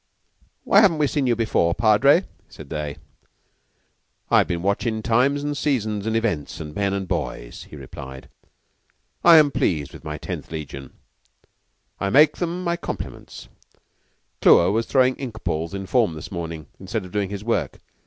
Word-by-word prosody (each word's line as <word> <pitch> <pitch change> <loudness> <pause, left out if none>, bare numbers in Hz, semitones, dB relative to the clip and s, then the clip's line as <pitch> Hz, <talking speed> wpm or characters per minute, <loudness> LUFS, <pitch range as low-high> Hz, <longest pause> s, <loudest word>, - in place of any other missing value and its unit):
"Why 200 - +5
haven't 190 -7 +4
we 150 - +2
seen 140 -1 0
you 120 - +3
before, 110 -7 +1
Padre?" 135 - +4 0.2
said - - -12
they. 75 -2 -4 1.3
"I've - - +5
been 85 0 -3
watching 110 +3 -1
times 130 +5 +2
and 145 0 -2
seasons 110 -8 -1
and 110 - 0
events 105 -11 -1
and 75 -1 -7
men 100 +3 0
and 100 -1 -3
boys," - - -4
he - - -10
replied. 65 -1 -10 1.0
"I 170 -1 +9
am 150 -2 +5
pleased 75 - -1
with - - -12
my 75 -1 -5
Tenth - - -6
Legion. 70 -4 -7 1.1
I 100 - -1
make 150 +6 +5
them 175 +1 -3
my 170 -1 0
compliments. - - -7 0.9
Clewer 85 +2 +6
was 115 +2 0
throwing 130 -1 +3
ink 120 -5 -7
balls 80 -1 -2
in 95 0 -5
form 110 -5 +1
this 80 - -9
morning, 85 -4 -5
instead 95 +2 -4
of 90 - -11
doing 100 -1 -1
his 100 0 -6
work. 115 +1 -1
105 Hz, 165 wpm, -23 LUFS, 85-135 Hz, 1.3 s, I